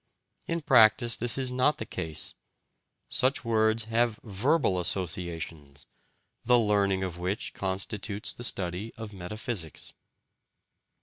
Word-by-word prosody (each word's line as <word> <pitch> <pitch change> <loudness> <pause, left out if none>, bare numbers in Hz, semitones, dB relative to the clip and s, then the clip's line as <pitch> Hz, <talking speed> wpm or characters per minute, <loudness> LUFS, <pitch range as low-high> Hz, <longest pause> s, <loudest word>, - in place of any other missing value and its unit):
In 170 0 -1
practice, 115 -5 +5
this 120 +1 0
is 130 -2 0
not 130 +4 +2
the - - -4
case: 80 -4 -3 0.7
such 130 0 +1
words 110 0 +2
have 115 0 +1
VERBAL 110 - +1
associations, 85 -5 -4 0.6
the 125 +1 +5
learning 100 -4 +2
of 90 -2 -4
which 95 +4 -3
constitutes 100 +2 -2
the 120 - -9
study 95 0 -2
of 110 -2 -8
metaphysics. 95 -2 -5
105 Hz, 115 wpm, -28 LUFS, 90-120 Hz, 0.7 s, practice